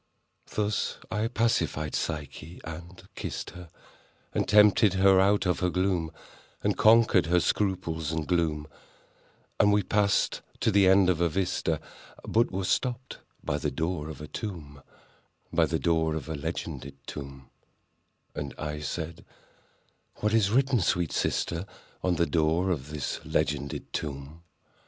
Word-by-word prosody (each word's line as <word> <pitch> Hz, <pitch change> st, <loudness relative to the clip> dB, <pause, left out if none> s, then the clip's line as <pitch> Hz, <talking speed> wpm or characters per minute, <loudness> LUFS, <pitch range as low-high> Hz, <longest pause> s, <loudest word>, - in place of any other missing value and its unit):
Thus 105 Hz, +1 st, 0 dB
I 110 Hz, +1 st, 0 dB
pacified 115 Hz, -10 st, 0 dB
Psyche 75 Hz, +2 st, -4 dB
and 85 Hz, +3 st, -9 dB
kissed -, -, -5 dB
her, 90 Hz, -1 st, -11 dB, 0.6 s
And -, -, 0 dB
tempted 105 Hz, -1 st, +6 dB
her 95 Hz, 0 st, +5 dB
out 100 Hz, +1 st, +3 dB
of 90 Hz, -, +1 dB
her 90 Hz, -, +1 dB
gloom— 90 Hz, -3 st, 0 dB, 0.5 s
And -, -, +2 dB
conquered 110 Hz, -4 st, +5 dB
her 90 Hz, +1 st, +4 dB
scruples 85 Hz, -6 st, -1 dB
and 80 Hz, -1 st, -2 dB
gloom; 80 Hz, -4 st, 0 dB, 0.9 s
And 105 Hz, -, +5 dB
we 105 Hz, 0 st, +3 dB
passed 100 Hz, +1 st, +1 dB, 0.2 s
to 115 Hz, -, +3 dB
the 100 Hz, -1 st, +5 dB
end 95 Hz, 0 st, +6 dB
of 85 Hz, -, -2 dB
the 85 Hz, -1 st, +3 dB
vista— 95 Hz, +2 st, -1 dB, 0.5 s
But 115 Hz, +1 st, +3 dB
were 95 Hz, 0 st, -3 dB
stopped 125 Hz, +5 st, -1 dB, 0.2 s
by 75 Hz, -, -1 dB
the 75 Hz, -, -1 dB
door 80 Hz, +2 st, -2 dB
of 75 Hz, -2 st, -8 dB
a 75 Hz, -, -7 dB
tomb— 75 Hz, -10 st, -7 dB, 0.7 s
By -, -, +4 dB
the -, -, 0 dB
door 80 Hz, -2 st, +1 dB
of 80 Hz, -3 st, -5 dB
a 80 Hz, -, -3 dB
legended 70 Hz, -2 st, -5 dB
tomb:— 70 Hz, -2 st, -8 dB, 0.8 s
And 70 Hz, -2 st, -5 dB
I 75 Hz, -1 st, -4 dB
said—"What 85 Hz, +6 st, -7 dB
is 110 Hz, -3 st, +4 dB
written, 130 Hz, +2 st, +3 dB
sweet 90 Hz, -2 st, +1 dB
sister, 85 Hz, +3 st, -1 dB, 0.4 s
On 90 Hz, -1 st, +2 dB
the 85 Hz, -, +2 dB
door 85 Hz, +3 st, +1 dB
of 75 Hz, -4 st, -3 dB
this 75 Hz, -3 st, -4 dB
legended 70 Hz, -1 st, -2 dB
tomb?" 75 Hz, +2 st, -5 dB
85 Hz, 140 wpm, -28 LUFS, 75-100 Hz, 0.9 s, tempted